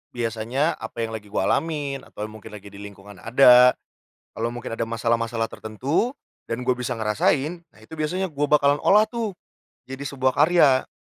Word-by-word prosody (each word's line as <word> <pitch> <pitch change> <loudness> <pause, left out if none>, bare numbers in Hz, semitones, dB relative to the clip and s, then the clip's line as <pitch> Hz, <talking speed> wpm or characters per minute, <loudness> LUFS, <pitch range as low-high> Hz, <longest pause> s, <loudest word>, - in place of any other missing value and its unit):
biasanya, 120 +6 -1
apa 115 - -5
yang 110 - -7
lagi 105 -2 -7
gua 100 - -1
alamin 145 -3 -1
atau 105 - -9
mungkin 110 -1 -11
lagi 100 0 -14
di 100 - -11
lingkungan 100 -1 -12
ada, 125 +2 +6 0.5
kalo 115 +1 -3
mungkin 115 -1 -6
ada 115 - -1
masalah-masalah 115 0 -1
tertentu 135 - -2 0.3
dan 115 +2 -4
gue 125 - 0
bisa 125 0 -3
ngerasain, 135 - 0
nah - - -22
itu 160 +9 -11
biasanya 180 +5 -1
gue 145 -1 -1
bakalan 145 -1 +3
olah 210 +2 +6
tuh 230 -5 -3 0.5
jadi 135 +1 -8
sebuah 130 -2 -1
karya. 150 -6 +4
125 Hz, 170 wpm, -23 LUFS, 110-145 Hz, 0.5 s, ada